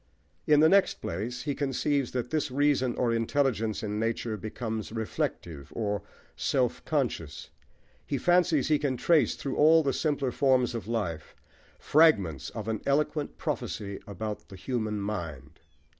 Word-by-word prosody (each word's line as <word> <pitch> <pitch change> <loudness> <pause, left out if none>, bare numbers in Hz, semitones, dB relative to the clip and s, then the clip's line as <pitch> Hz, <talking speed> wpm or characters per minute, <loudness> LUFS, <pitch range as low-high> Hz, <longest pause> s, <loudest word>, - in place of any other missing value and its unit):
In 150 -1 +6
the 160 - +7
next 195 +3 +4
place, 115 +8 -4
he 145 - -1
conceives 140 -1 0
that 125 -1 -3
this 155 -1 0
reason 130 -2 +2
or 120 -2 +1
intelligence 115 -2 0
in 105 0 -2
nature 115 0 -1
becomes 110 +1 -5
reflective, 85 -9 -4
or 105 -2 -1 0.3
self 125 -3 0
conscious. 120 - -2 0.6
He 140 - -1
fancies 175 -1 +3
he 150 -2 +3
can 135 -4 -1
trace, 155 -3 +3
through 135 - -4
all 160 +2 +6
the 135 -2 +1
simpler 145 -4 0
forms 130 -2 +2
of 115 -3 -5
life, 90 -9 -3 0.4
fragments 100 - +3
of 110 -1 -7
an 110 -2 -2
eloquent 150 +1 0
prophecy 100 -2 -4
about 105 +1 -5
the 95 - -10
human 110 +1 -2
mind. 85 -9 -5
120 Hz, 145 wpm, -28 LUFS, 105-145 Hz, 0.6 s, the